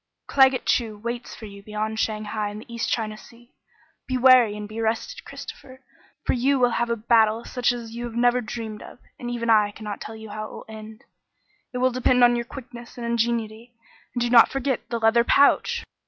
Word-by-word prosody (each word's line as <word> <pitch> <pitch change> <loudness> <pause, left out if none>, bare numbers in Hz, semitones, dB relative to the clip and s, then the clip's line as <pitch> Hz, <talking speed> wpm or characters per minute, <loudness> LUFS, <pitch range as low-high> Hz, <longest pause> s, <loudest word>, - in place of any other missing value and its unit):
"Claggett 265 -2 +4
Chew 225 -4 0
waits 235 +3 -5
for 220 - -10
you 200 -1 -11
beyond 215 +1 -4
Shanghai 215 -1 -2
in 205 - -8
the 225 +2 -11
East 235 - -2
China 215 -2 -1
Sea. 235 +3 -17 0.5
Be 255 - -1
wary, 250 -4 +6
and 210 0 -6
be 220 +2 -6
rested, 225 - -2
Christopher, 265 -2 -10 0.4
for - - +2
you 270 +3 +2
will 245 -2 +3
have 235 0 -1
a 235 - +1
battle 225 0 +2
such 250 -1 0
as 235 -2 -6
you 240 +1 -5
have 235 -1 -7
never 245 +1 +3
dreamed 220 -1 -6
of, - - -12 0.2
and 240 - -5
even 235 -1 -1
I 210 -2 +5
cannot 210 0 -7
tell 220 0 -8
how 215 +1 -6
it - - -13
will - - -10
end. 220 +2 -11 0.7
It 250 - -5
will 255 +1 +2
depend 250 0 +3
on 240 0 +6
your 235 0 -2
quickness 240 -2 -11
and 240 - -5
ingenuity. 235 0 -2 0.4
And 245 - -1
do 240 0 0
not 235 -2 +8
forget 265 -4 -2
the 235 - -1
leather 225 +1 +4
pouch!" 460 - +3
235 Hz, 205 wpm, -24 LUFS, 220-245 Hz, 0.7 s, not